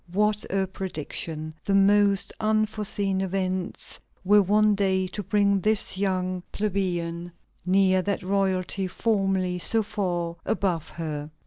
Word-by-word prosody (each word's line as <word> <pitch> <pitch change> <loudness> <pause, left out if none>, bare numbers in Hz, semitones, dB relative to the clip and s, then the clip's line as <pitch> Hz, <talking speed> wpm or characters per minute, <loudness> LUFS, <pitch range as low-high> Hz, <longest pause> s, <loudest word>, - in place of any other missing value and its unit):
What 210 +2 +1
a 195 0 +1
prediction! 160 -4 -5
The 200 - +1
most 200 0 +4
unforeseen 210 -3 0
events 185 -1 -2 0.3
were 205 +2 +6
one 210 +2 +3
day 190 -2 +1
to 205 - -5
bring 200 0 +2
this 215 0 +1
young 185 -1 -1
plebeian 175 -4 -2 0.4
near 190 0 +4
that 200 +1 -2
royalty 190 0 0
formerly 190 -3 0
so 225 +5 +4
far 175 -5 -3
above 180 -7 -1
her. 155 -2 -5
195 Hz, 120 wpm, -25 LUFS, 180-205 Hz, 0.4 s, were